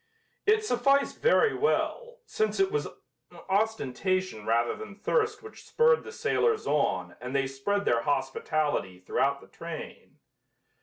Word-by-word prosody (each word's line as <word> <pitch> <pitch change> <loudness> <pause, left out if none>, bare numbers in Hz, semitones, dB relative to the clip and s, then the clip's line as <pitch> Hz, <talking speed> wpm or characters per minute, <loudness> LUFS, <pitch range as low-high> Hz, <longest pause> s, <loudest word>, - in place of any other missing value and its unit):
It 435 0 +4
sufficed 275 - +2
very 460 -2 +4
well, 485 +2 -1
since 435 -2 -1
it 390 0 +3
was 445 - -1 0.6
ostentation 185 - -1
rather 115 +1 +2
than 215 -2 -9
thirst 430 - 0
which 435 - -12
spurred 470 0 +3
the - - -9
sailors 450 -1 +1
on 90 -12 0
and 125 +2 -5
they 135 -1 +2
spread 200 +10 -2
their 115 -1 +2
hospitality 135 - -1
throughout 140 +9 0
the - - -15
train. 165 -1 -9
200 Hz, 135 wpm, -28 LUFS, -, 0.6 s, It